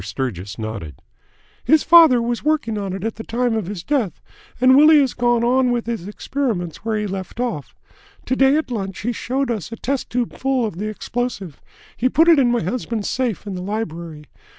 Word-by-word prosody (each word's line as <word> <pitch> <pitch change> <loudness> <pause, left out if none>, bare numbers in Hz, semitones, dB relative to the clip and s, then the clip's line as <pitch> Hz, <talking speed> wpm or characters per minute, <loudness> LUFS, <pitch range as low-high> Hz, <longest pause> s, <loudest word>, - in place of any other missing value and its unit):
Sturgis 100 -2 -5
nodded. 110 - -6 0.7
"His 315 -1 +4
father 315 -8 +7
was 240 0 -2
working 300 -7 0
on 200 -2 -3
it 190 0 -5
at 225 0 -3
the 225 - -6
time 240 +1 -1
of 215 -5 -2
his 190 -4 -6
death, 255 - -1 0.4
and 255 +1 +6
Willie 305 +2 +7
has 270 -3 +1
gone 240 -1 +1
on 250 +1 +3
with 240 -1 -1
his 225 -6 -4
experiments 210 - -3
where 220 0 -2
he 210 - -2
left 190 +2 -6
off. 235 - -3 0.5
To 260 - 0
day 270 +2 +4
at 310 -5 -3
lunch 195 -5 -4
he 240 - -1
showed 255 +2 -2
us 215 -4 -4
a - - -4
test 270 +3 -3
tube 245 -1 -2
full 265 -2 0
of 210 -6 -5
the 210 - -2
explosive. 215 - -4 0.3
He 255 - +1
put 325 +5 +4
it 325 -4 +6
in 250 -3 +3
my 240 -5 0
husband's 225 +2 -3
safe 240 -6 -2
in 200 - -5
the 180 - -5
library. 170 -6 -5
230 Hz, 205 wpm, -20 LUFS, 190-255 Hz, 0.7 s, father